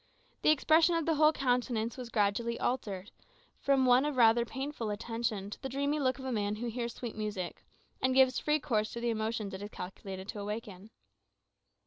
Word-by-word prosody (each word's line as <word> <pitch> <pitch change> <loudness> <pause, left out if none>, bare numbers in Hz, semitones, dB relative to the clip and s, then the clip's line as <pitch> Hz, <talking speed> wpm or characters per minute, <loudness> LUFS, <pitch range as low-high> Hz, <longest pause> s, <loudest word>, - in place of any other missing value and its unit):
The - - +4
expression 315 +3 +5
of 330 -2 0
the 330 - +2
whole 305 0 +5
countenance 245 -5 0
was 250 -2 -7
gradually 230 +2 0
altered, 205 -6 -2 0.5
from 275 -2 +3
one 250 +1 +6
of 295 -1 -1
rather 235 0 +5
painful 265 -2 -4
attention 210 -1 -3
to - - -8
the 270 - -4
dreamy 280 +3 0
look 260 -2 +1
of 265 - -8
a 260 - -2
man 210 -2 0
who 235 +2 -3
hears 235 0 -4
sweet 240 -3 -6
music, 210 -5 -4 0.4
and 260 0 +2
gives 265 -1 +5
free 300 0 +1
course 220 -7 0
to 235 - -4
the 235 0 0
emotions 220 -2 -2
it 190 - -6
is 205 - -6
calculated 190 0 -7
to 210 - -5
awaken. 210 -1 -6
235 Hz, 190 wpm, -31 LUFS, 210-265 Hz, 0.5 s, one